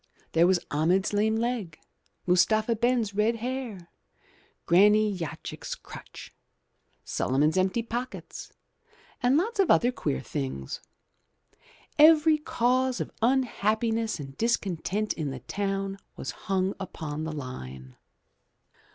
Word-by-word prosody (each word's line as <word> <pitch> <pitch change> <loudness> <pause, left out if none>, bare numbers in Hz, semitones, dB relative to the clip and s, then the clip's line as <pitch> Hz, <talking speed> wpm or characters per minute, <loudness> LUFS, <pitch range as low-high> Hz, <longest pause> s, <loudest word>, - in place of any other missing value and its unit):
There 165 +1 +4
was 185 -1 +3
Ahmed's 175 +7 +2
lame 215 +2 +2
leg, 225 -8 -2 0.5
Mustapha 215 +6 +3
Ben's 235 -2 +1
red 215 +3 +2
hair. 230 -7 -5 0.7
Granny 210 +3 +5
Yochki's 170 -4 -6
crutch, - - -11 0.7
Suliman's 145 +5 +1
empty 190 +5 +1
pockets, 240 +3 -6 0.7
and 250 +3 +4
lots 425 +6 -1
of 390 - +4
other 245 +1 +5
queer 65 - -2
things. 65 0 -5 1.2
Every 310 0 +7
cause 255 -2 +1
of - - -4
imhappiness 225 -3 +1
and 135 -2 -8
discontent 210 -2 0
in 155 -3 -3
the 130 -2 -6
town 195 - -3 0.2
was - - -4
hung 195 -1 -1
upon 155 -5 -5
the 160 - -3
line. 65 - -8
205 Hz, 110 wpm, -27 LUFS, 165-240 Hz, 1.2 s, Every